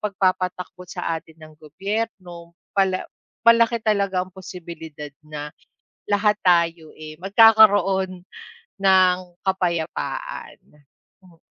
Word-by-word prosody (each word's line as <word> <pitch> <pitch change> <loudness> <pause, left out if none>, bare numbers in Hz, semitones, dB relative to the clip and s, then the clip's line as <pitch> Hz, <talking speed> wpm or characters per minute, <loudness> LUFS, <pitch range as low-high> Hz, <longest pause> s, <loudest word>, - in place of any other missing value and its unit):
pagpapatakbo 185 -2 -2
sa 175 -2 -3
atin 160 0 -20
ng 155 0 -13
gobyerno, 180 0 -5 0.2
pala 190 -1 +1 0.4
malaki 230 0 +5
talaga 200 -3 +1
ang 185 - -10
posibilidad 165 -5 -9
na 150 -1 -7 0.6
lahat 210 +1 +3
tayo 170 -3 +2
eh, 155 0 -9
magkakaroon 195 -3 +5 0.6
ng 185 -2 +5 0.3
kapayapaan, 190 - -3 0.7
hmm. 175 -2 -20
185 Hz, 95 wpm, -22 LUFS, 170-200 Hz, 0.7 s, malaki